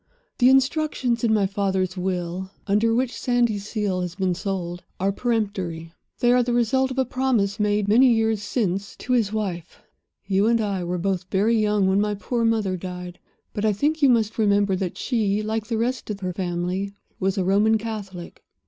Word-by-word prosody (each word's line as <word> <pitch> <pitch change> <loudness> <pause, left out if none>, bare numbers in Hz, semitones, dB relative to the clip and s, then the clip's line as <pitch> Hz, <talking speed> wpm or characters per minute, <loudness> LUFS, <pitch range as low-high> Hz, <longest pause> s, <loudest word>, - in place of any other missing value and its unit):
The 250 0 +6
instructions 265 -3 +1
in 230 - +3
my 210 -2 +3
father's 190 -2 -1
will, 180 0 -3 0.2
under 210 +3 +2
which 245 +2 +1
Sandyseal 210 -5 0
has 180 -1 -4
been 190 -2 0
sold, 180 -2 -4 0.2
are 195 +2 +1
peremptory. 195 -8 -2 0.3
They 240 -1 +4
are 250 - +4
the 240 0 -1
result 260 +3 +2
of 260 - -6
a 265 - +2
promise 240 -6 0
made, 210 -1 +1
many 245 +5 +6
years 225 -2 +1
since, 200 -2 -2
to 250 - -3
his 225 -5 +2
wife. 190 -6 -4 0.5
"You 195 +2 +2
and 230 0 +3
I 200 -4 -1
were 175 +1 -2
both 185 0 -1
very 210 +4 +2
young 210 -2 +2
when 190 +1 +3
my 210 0 0
poor 230 +3 -2
mother 215 -5 +1
died; 180 0 -7 0.3
but 205 - -3
I 215 -1 +3
think 300 +9 0
you 280 - +6
must 225 -2 +1
remember 200 -2 +3
that 185 -1 -3
she, 215 -4 0
like 220 0 -2
the 230 -1 -1
rest 245 +2 -2
of 205 -1 -4
her 180 -1 -3
family, 180 +2 -2 0.3
was 195 +1 0
a 190 - +1
Roman 205 +4 +3
Catholic. 205 -5 -7
205 Hz, 185 wpm, -23 LUFS, 190-230 Hz, 0.5 s, The